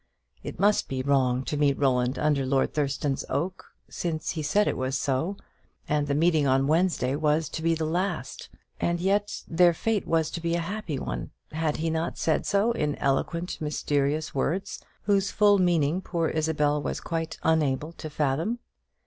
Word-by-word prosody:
It - - -7
must 205 +2 +3
be 130 -1 -3
wrong 130 -2 +2
to 150 - -3
meet 145 -2 +2
Roland 130 -2 +1
under 150 -2 +1
Lord 135 0 +1
Thurston's 140 -2 -1
oak, 170 +7 -2 0.2
since 160 -3 -3
he 160 - -3
said 200 +8 +2
it - - 0
was 130 +1 -1
so; 155 +10 -1 0.5
and 150 -1 +1
the 140 - 0
meeting 155 -2 +3
on 135 +1 +3
Wednesday 155 -4 +1
was 150 +1 +1
to 160 - -5
be 165 0 +2
the 160 0 -2
last; 170 -4 -2 0.3
and 170 0 0
yet 200 +3 0
their 170 0 +4
fate 220 +3 -1
was 160 -1 +1
to 170 - -5
be 170 0 0
a - - 0
happy 180 -3 -4
one; - - -4 0.2
had 155 -1 -1
he 165 0 -1
not 160 +1 -2
said 160 - 0
so, 205 +4 +2
in 150 -10 -1
eloquently 165 +5 -1
mysterious 150 0 0
words, 165 +8 -2 0.2
whose 200 -1 +2
full 205 -1 +4
meaning 175 -1 +2
poor 170 -3 -1
Isabel 150 -2 +1
was - - -3
quite 165 -1 -3
unable 155 -1 +1
to 160 -2 -8
fathom? 150 - 0
155 Hz, 175 wpm, -27 LUFS, 140-175 Hz, 0.5 s, their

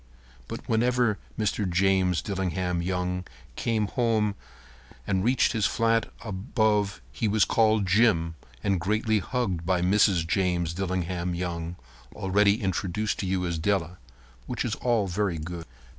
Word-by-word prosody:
But - - -7
whenever 120 -1 +2 0.2
Mr. 105 -2 0
James 95 0 +2
Dillingham 90 -3 -1
Young 90 0 -2 0.3
came 110 -2 0
home 110 -2 +1 0.7
and 95 -2 0
reached 125 +4 +3
his 110 -6 +1
flat 115 0 +1
above 105 - 0
he 110 - -1
was 105 0 +3
called 110 -2 +3
"Jim" 90 -4 +3 0.3
and 100 -3 +1
greatly 105 +3 +1
hugged 100 -7 -2
by 90 0 +1
Mrs. 95 -2 +3
James 85 -2 0
Dillingham 90 -1 -2
Young, 85 -1 -3 0.4
already 100 +2 +2
introduced 95 +2 -1
to 95 - -2
you 90 -1 0
as 85 -2 -2
Della. 90 -1 -1 0.5
Which - - -2
is - - -1
all 120 -4 +1
very 95 -1 -1
good. 85 +1 -6
95 Hz, 135 wpm, -27 LUFS, 90-110 Hz, 0.7 s, reached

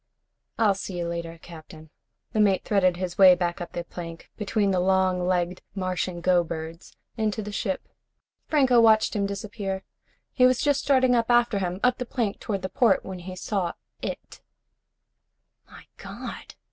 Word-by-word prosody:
"I'll 215 -3 +4
see 190 -1 -6
you 170 -1 -2
later, 170 -1 -5
Captain." 160 -2 -12 0.4
The 220 - 0
mate 200 -3 +3
threaded 185 -4 +2
his 180 0 -5
way 190 -2 +9
up 175 -1 -3
the 175 - -3
plank, 165 -1 -9
between 210 -1 0
the 185 - +1
long 185 -1 +2
legged 180 0 0
Martian 185 -2 -2
go 180 0 +3
birds, 165 0 -8 0.2
into 215 -1 -1
the 210 - -6
ship. 195 -2 -3 0.6
Franco 260 -6 +4
watched 220 -1 +4
him 200 -1 0
disappear. 200 -1 -4 0.5
He 255 -1 +5
was 255 -1 +2
just 285 -2 +2
starting 260 -2 +3
up 230 -1 +1
after 240 -3 +3
him, 180 -1 -3
up 250 +1 +3
the 250 - -4
plank 225 -6 -2
toward 195 -3 -3
the - - -1
port, 200 +1 +2
when 190 -1 -6
he 185 +1 -8
saw 185 -1 -2 0.3
it. - - -6 1.3
"My - - -14
God!" - - -8
190 Hz, 165 wpm, -25 LUFS, 175-215 Hz, 1.3 s, way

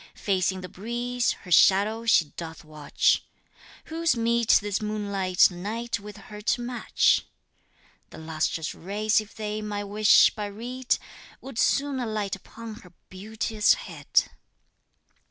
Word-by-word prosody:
Facing 190 -1 0
the 185 - -7
breeze, 240 +6 -2
her 180 - -11
shadow 210 +6 +4
she 165 -8 +4
doth 165 0 -9
watch, 155 -2 +1 0.6
Who's 325 -4 0
meet 235 0 +3
this 205 0 -3
moonlight 200 -4 +2
night 220 +6 -4
with 210 0 -10
her 210 +1 -11
to 235 +3 0
match? 245 0 +1 0.8
The - - -12
lustrous 160 0 -2
rays 210 +4 0
if 215 - -14
they 215 -1 -4
my 205 -1 -4
wish 205 +1 +5
but 205 -2 -5
read 250 +2 -1 0.4
Would 265 -3 -7
soon 280 -1 +1
alight 215 -5 -2
upon 220 +3 -10
her 180 -6 -16 0.2
beauteous 215 +2 +1
head! - - 0
210 Hz, 130 wpm, -26 LUFS, 190-230 Hz, 0.8 s, wish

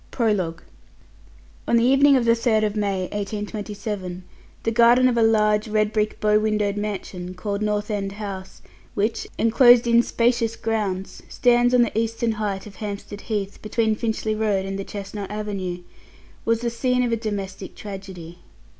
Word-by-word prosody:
PROLOGUE. 195 -9 -1 1.0
On 235 - +4
the 230 - +3
evening 275 +3 +5
of 245 - 0
May 230 - +5
3, 230 +1 0
1827, 205 -1 -3 0.4
the 225 - 0
garden 240 +2 +5
of 250 - +1
a 235 - +2
large 215 -1 +3
red 215 0 +1
brick 215 -1 0
bow 210 -1 +3
windowed 210 -2 0
mansion 190 -3 -5
called 200 +2 -3
North 210 0 -1
End 195 -1 -2
House, 195 -2 -7 0.3
which, 215 +3 -1
enclosed 240 +1 +6
in 235 0 +5
spacious 235 -1 +1
grounds, 205 -4 -3
stands 245 0 +3
on 245 - +6
the 235 - -3
eastern 230 +1 0
height 210 -3 -3
of 210 - -12
Hampstead 205 -1 -6
Heath, 205 -3 -4
between 220 +1 0
Finchley 220 0 -2
Road 210 -3 0
and 195 0 -4
the - - -3
Chestnut 200 0 -6
Avenue, 195 -4 -4 0.6
was 230 0 +1
the 235 -1 -1
scene 250 +1 +1
of 240 - 0
a - - +3
domestic 200 -4 -5
tragedy. 190 -4 -9
210 Hz, 155 wpm, -23 LUFS, 200-230 Hz, 1.0 s, enclosed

